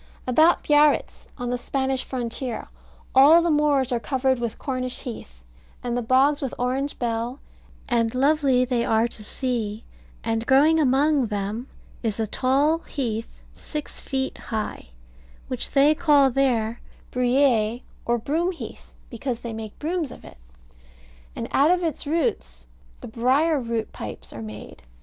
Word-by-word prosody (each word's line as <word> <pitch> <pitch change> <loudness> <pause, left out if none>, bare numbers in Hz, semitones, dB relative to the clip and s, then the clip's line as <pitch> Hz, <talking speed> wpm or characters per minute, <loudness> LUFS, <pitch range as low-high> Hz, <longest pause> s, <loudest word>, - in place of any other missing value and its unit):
About 315 +7 +4
Biarritz, 295 0 +3
on 245 -2 -3
the 245 - -1
Spanish 265 0 -1
frontier, 245 -1 -4 0.4
all 300 +6 +7
the 340 - +2
moors 290 -3 +2
are 240 - +1
covered 260 0 0
with 235 -2 -3
Cornish 255 -2 -4
heath, - - -9 0.4
and 240 -1 -2
the 245 - 0
bogs 265 +5 +3
with 270 -3 -3
Orange 260 +3 -1
bell, 235 +2 -2 0.5
and 235 -1 +1
lovely 270 -2 +3
they 245 -2 0
are 225 0 +2
to 220 -2 -1
see; 225 -2 -2 0.4
and 225 0 -1
growing 300 +5 +5
among 280 -1 +3
them 210 +4 -3 0.3
is 225 -2 -2
a 220 - +1
tall 275 +8 +2
heath 230 -8 -5
six 300 -1 -5
feet 265 0 -3
high, 215 - -4 0.6
which 255 - +2
they 285 +2 +5
call 295 -4 +4
there 235 -4 0 0.3
bruyere, 245 -2 +2 0.2
or 240 0 +1
Broomheath, 330 +9 -3 0.2
because 240 0 -4
they 235 -1 -5
make 220 -1 -7
brooms 325 -1 -2
of - - -12
it: - - -13 1.0
and - - -4
out 285 +3 +4
of 360 0 +2
its 315 -3 -2
roots 65 - -1 0.4
the - - -8
"briar 270 +7 +2
root" 230 -2 -3
pipes 105 - -8
are 115 - -7
made. 105 -1 -9
255 Hz, 145 wpm, -24 LUFS, 230-285 Hz, 1.0 s, all